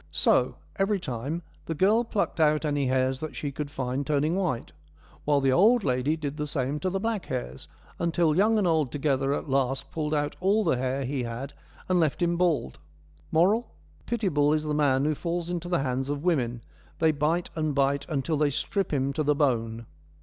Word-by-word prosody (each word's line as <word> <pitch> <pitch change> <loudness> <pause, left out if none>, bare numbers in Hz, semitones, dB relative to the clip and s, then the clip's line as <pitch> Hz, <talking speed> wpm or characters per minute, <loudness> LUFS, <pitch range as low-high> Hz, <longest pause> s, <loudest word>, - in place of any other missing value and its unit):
So, - - +2 0.2
every 195 0 +1
time, 150 +2 -4 0.2
the 165 - -2
girl 210 +8 +3
plucked 215 -6 -2
out 155 0 +3
any 145 -2 0
hairs 130 0 +1
that 155 +1 -6
she 145 - -3
could 145 +1 -5
find 130 0 -2
turning 150 +3 +1
white, 175 -11 -2 0.5
while 145 -1 +3
the 135 -1 +2
old 215 - +5
lady 130 +3 +1
did 150 -2 -4
the 150 -1 -2
same 140 0 -2
to 185 - -1
the 190 +1 -2
black 220 -1 -2
hairs, - - -5 0.3
until 170 -2 +2
young 215 +5 +4
and 205 - +2
old 160 -7 +2
together 135 -2 0
at 145 - -2
last 135 -1 0
pulled 155 -1 -1
out 145 0 -1
all 200 +4 +2
the 165 -9 +2
hair 130 +2 -1
he 135 0 -2
had 120 +4 -5 0.3
and 185 -1 +2
left 155 -4 +1
him 175 -1 +1
bald. 165 - 0 0.5
Moral: 205 +9 +2 0.3
Pitiable 170 -11 +2
is 155 0 0
the 150 -1 -2
man 140 -2 +2
who 155 - +2
falls 170 +2 -3
into 175 0 -3
the 175 -6 +1
hands 130 +1 -2
of 145 0 -3
women: 125 -9 0 0.3
they 160 -1 +3
bite 155 +4 0
and 155 -3 -1
bite 140 0 +1
until 155 +1 -1
they 150 0 +2
strip 180 +7 -2
him 140 -1 0
to 155 - -1
the 150 0 +2
bone. 115 -5 0
150 Hz, 200 wpm, -27 LUFS, 135-170 Hz, 0.5 s, old